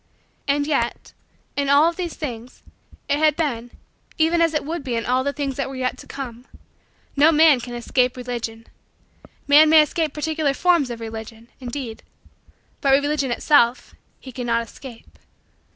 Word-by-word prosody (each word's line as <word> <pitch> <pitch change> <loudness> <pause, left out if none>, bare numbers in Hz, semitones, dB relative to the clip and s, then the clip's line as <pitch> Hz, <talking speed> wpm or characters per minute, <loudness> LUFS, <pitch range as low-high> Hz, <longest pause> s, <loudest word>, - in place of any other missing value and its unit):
And 285 +1 +1
yet, 275 -6 -2 0.4
in 280 -1 -1
all 285 +3 +6
of 340 - -1
these 350 -2 -4
things 245 -4 -7 0.4
it 285 0 +1
had 305 -1 +3
been 245 -7 -2 0.5
even 330 +1 +2
as 330 -1 +2
it 300 - -1
would 325 0 -4
be 250 -3 -3
in 230 - -2
all 255 +1 +1
the 280 - -1
things 280 -2 -4
that 275 -2 -2
were 270 - -7
yet 255 -1 -2
to - - -12
come. 250 -2 -8 0.7
No 295 +3 +5
man 310 -3 +5
can 240 0 -7
escape 250 +1 0
Religion. 235 -2 -5 0.8
Man 300 +2 +7
may 315 -1 +7
escape 315 0 -2
particular 300 -1 -1
forms 340 -6 +2
of 235 -1 -7
Religion, 225 +1 -8
indeed, 245 -2 -6 0.8
but 275 -1 +3
Religion 285 0 +1
itself 245 -1 +2 0.3
he 260 - -11
cannot 235 -2 -1
escape. 245 -3 -13
275 Hz, 165 wpm, -22 LUFS, 240-300 Hz, 0.8 s, Man